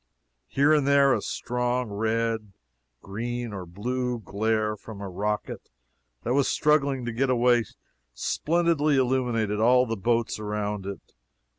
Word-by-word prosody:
Here 145 +3 +3
and 145 -3 +2
there 140 -1 +5
a - - 0
strong 125 -1 -2
red, 110 0 -1 0.5
green, 120 +3 -4
or 95 -3 -6
blue 125 +7 -2
glare 110 0 -1
from 105 0 -10
a 100 - -5
rocket 105 +3 -3 0.5
that 120 - 0
was 140 0 +3
struggling 140 -4 +2
to 120 - -2
get 130 +4 0
away, 120 -2 +3 0.5
splendidly 155 - +1
illuminated 120 -5 +1
all 125 +3 +5
the 115 -2 -2
boats 115 +2 0
around 105 -2 -3
it. 100 - -8
120 Hz, 135 wpm, -26 LUFS, 105-130 Hz, 0.5 s, there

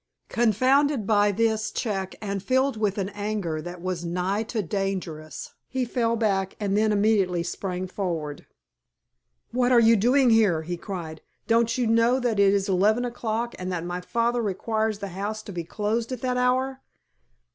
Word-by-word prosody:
Confounded 255 +3 +2
by 205 -1 +3
this 220 0 +1
check 195 -5 -3
and 200 -2 -3
filled 260 +4 +1
with 210 -2 -1
an 195 -1 -1
anger 205 -6 -3
that 175 +1 -8
was 185 -2 -3
nigh 180 +4 -1
to 225 -1 -3
dangerous, 175 -4 -4
he 260 -1 -1
fell 230 -1 0
back 195 -4 0
and 200 -2 0
then 215 +1 +3
immediately 200 -4 +2
sprang 180 +1 -4
forward. 165 -6 -4 1.0
"What 245 +1 +2
are 245 - +7
you 230 0 +6
doing 250 +4 +4
here?" 200 -8 +3
he 175 +2 -3
cried. 170 -4 -7 0.2
"Don't 230 +1 +2
you 250 - +1
know 230 +3 +3
that 240 -5 0
it 200 -1 +6
is 195 -1 +1
eleven 210 +6 +2
o'clock 235 -1 -3
and 185 0 -4
that 175 -2 -3
my 175 +1 -4
father 235 +5 0
requires 220 +1 -1
the 200 -1 -6
house 205 +4 -4
to 205 - -8
be 175 -3 -4
closed 220 +7 -2
at 255 -3 -4
that 255 -1 0
hour?" 260 +2 +1
210 Hz, 170 wpm, -25 LUFS, 185-235 Hz, 1.0 s, are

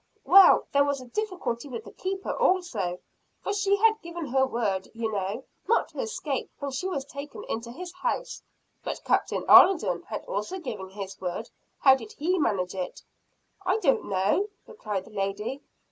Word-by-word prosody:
"Well, 390 +1 +8
there 280 0 +5
was 285 -1 0
a 255 - -10
difficulty 355 - -3
with 240 -4 -6
the - - -11
Keeper 385 +1 -3
also 230 - +1 0.5
for 405 - -1
she 400 0 +2
had 440 +1 +3
given 340 -1 -6
her 265 0 +2
word, 205 -6 -1
you 225 -1 -2
know, 205 +4 -2 0.2
not 465 - +2
to - - -10
escape, 455 -3 -3
when 280 -1 -4
she 275 +8 -2
was 280 -8 -3
taken 280 +1 -8
into 230 +1 -4
his 350 +6 -8
house." 370 +7 -3 0.4
"But - - -5
Captain - - +1
Alden 390 - +7
had - - -5
also - - -3
given 205 - -6
his 195 0 -8
word. 180 -1 -4 0.3
How 265 - +8
did 225 -5 -4
he 355 +5 0
manage 190 - 0
it?" 185 -2 -5 0.6
"I 380 - +2
do 310 -11 +4
not - - -5
know," 200 - +1 0.2
replied 205 - -4
the - - -15
lady. 210 +6 -3
270 Hz, 175 wpm, -27 LUFS, -, 0.6 s, Well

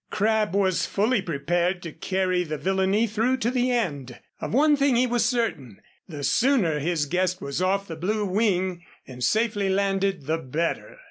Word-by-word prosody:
Crabb 215 -2 +1
was 190 -3 +1
fully 215 +2 +1
prepared 175 +3 -1
to 165 - -6
carry 185 +2 -1
the 155 -2 -4
villainy 190 +5 +1
through 225 +4 0
to 235 -1 -1
the 250 0 +1
end. 145 - -2 0.2
Of - - -5
one 295 +5 +4
thing 280 -2 +2
he 245 +2 +3
was 240 -2 +1
certain, 225 - -2 0.3
the 150 -5 -7
sooner 220 - +2
his 160 0 0
guest 185 +3 0
was 140 +5 -4
off 195 +2 0
the 165 - -6
Blue 205 +6 -1
Wing 185 -3 0 0.2
and 125 -1 -8
safely 210 - +1
landed 195 -3 0
the 160 +3 -1
better. 165 - -3
190 Hz, 175 wpm, -25 LUFS, 165-220 Hz, 0.3 s, one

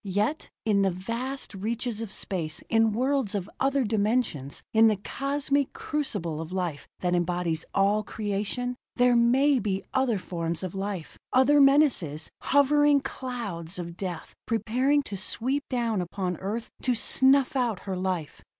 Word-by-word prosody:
Yet 205 - -1 0.2
in 205 -3 +3
the 195 - +3
vast 230 +10 -4
reaches 225 +3 -3
of 225 -3 -5
space, 170 -6 -2
in 225 -1 +4
worlds 255 -1 0
of 195 -2 -2
other 275 0 +2
dimensions, 210 - 0
in 225 0 +6
the 215 - +3
cosmic 275 +6 -1
crucible 195 - -2
of 165 +1 -7
life 175 -6 -3
that 180 -1 +1
embodies 175 -2 0
all 200 +2 +3
creation, 215 +4 -3 0.2
there 245 -1 +4
may 260 +4 +4
be 195 -3 -2
other 260 -5 +2
forms 170 -2 -3
of 185 - -4
life, 195 -3 -5
other 280 +3 +5
menaces, 275 - +3
hovering 285 0 +4
clouds 225 -11 -5
of 170 -1 -6
death, 180 -3 -5
preparing 255 +5 +1
to 205 - -6
sweep 260 +9 -2
down 235 -6 0
upon 180 +1 -3
Earth 215 +4 -4
to 250 -1 +1
snuff 265 +4 +4
out 240 -7 0
her 190 -2 -4
life. 180 -4 -3
215 Hz, 150 wpm, -27 LUFS, 185-260 Hz, 0.2 s, in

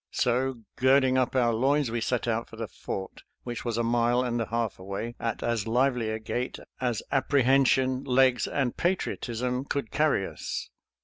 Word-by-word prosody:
So, 125 0 0 0.2
girding 130 0 +4
up 130 +1 0
our 120 -2 +3
loins, 135 +2 +2
we 120 0 -1
set 120 +1 -1
out 115 0 -1
for - - -11
the 115 -1 -4
fort, 95 -1 -6 0.2
which 120 -2 -5
was 115 -2 -2
a 120 - +1
mile 120 +1 +2
and 120 -1 -1
a 115 - -2
half 115 -3 -2
away, 100 +5 -5
at 115 -1 -3
as 115 -2 -1
lively 125 -1 +1
a 110 - -1
gait 120 +3 -3 0.2
as 120 -4 -1
appre 140 0 +2
hension, 130 0 +3
legs, 130 -1 +3
and 135 -4 -1
patriotism 125 -8 -1
could 140 -4 -3
carry 150 -10 +2
us. - - -5
120 Hz, 180 wpm, -27 LUFS, 115-130 Hz, 0.2 s, girding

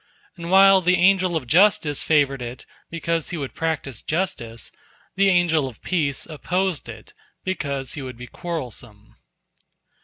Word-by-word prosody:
And 170 -2 -7
while 195 0 +7
the 180 +1 +3
Angel 185 -1 +3
of 155 -5 -2
Justice 160 - +3
favored 140 -4 +2
it, 120 +1 -7 0.2
because 165 -1 -2
he 175 - -4
would 140 -4 -5
practice 155 -7 -3
justice, 120 - -3 0.4
the 195 0 +4
Angel 170 -6 +2
of 120 -5 -12
Peace 150 -7 -1
opposed 180 +2 -2
it, - - -11 0.3
because 140 -8 -3
he 145 - -6
would 130 -2 -7
be 125 - -8
quarrelsome. 125 - -7
160 Hz, 145 wpm, -23 LUFS, 135-180 Hz, 0.4 s, while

